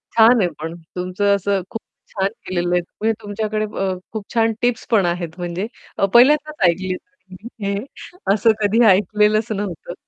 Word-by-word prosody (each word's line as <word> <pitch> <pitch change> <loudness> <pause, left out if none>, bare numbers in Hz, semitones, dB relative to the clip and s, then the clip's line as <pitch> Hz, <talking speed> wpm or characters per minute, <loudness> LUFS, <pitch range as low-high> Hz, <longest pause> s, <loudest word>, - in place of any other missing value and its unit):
छान 230 +1 +6
आहे 180 - +2
पण 165 +2 -5 0.2
तुमचं 185 +3 +1
असं 200 0 0
खूप 225 - -6 0.3
छान 195 -1 0 0.2
केलेलं 175 -1 -1
आहे. 175 - +2
म्हणजे 220 +5 -2
तुमच्याकडे 215 +1 -2
अ, 190 -1 0 0.2
खूप 215 -2 -5
छान 225 -1 +2
टिप्स 245 -1 0
पण 205 -5 +4
आहेत, 175 -1 -3
म्हणजे 175 +4 -3 0.3
अ, - - +3
पहिल्यांदाच 290 -2 +5
ऐकली 185 +2 -2 0.7
हे 200 0 -1 0.6
असं 215 +2 +4
कधी 220 +4 +3
ऐकलेलंच 210 +2 +3
नव्हतं. 195 -4 -4
200 Hz, 155 wpm, -20 LUFS, 180-220 Hz, 0.7 s, छान